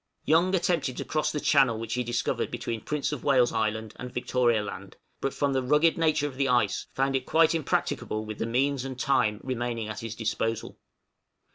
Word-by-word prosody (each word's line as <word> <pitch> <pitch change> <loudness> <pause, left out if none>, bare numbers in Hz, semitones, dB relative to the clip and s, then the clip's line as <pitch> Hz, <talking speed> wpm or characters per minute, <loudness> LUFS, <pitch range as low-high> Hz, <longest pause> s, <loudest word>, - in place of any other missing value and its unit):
Young 175 +4 +3
attempted 170 -8 0
to - - -4
cross 150 -1 0
the 150 - -2
channel 135 -7 +3
which 115 0 -4
he 125 - 0
discovered 120 0 -1
between 115 -2 -4
Prince 150 +3 -2
of 150 - -5
Wales' 130 -4 +3
Island 110 -1 -1
and 125 0 -7
Victoria 120 -3 +1
Land; 100 - -8 0.2
but 135 - -1
from 140 0 0
the 130 - +1
rugged 150 +5 +3
nature 155 -3 +2
of 135 -3 -5
the 135 0 +1
ice, 120 -6 +1
found 135 0 +1
it 130 -1 -2
quite 165 0 +4
impracticable 110 -8 -1
with 110 -1 -7
the 115 - -1
means 135 +3 +1
and 130 -1 -6
time 120 -6 +2
remaining 120 -3 -3
at 105 - -5
his 115 -1 -6
disposal. 115 0 -2
125 Hz, 195 wpm, -27 LUFS, 115-145 Hz, 0.2 s, quite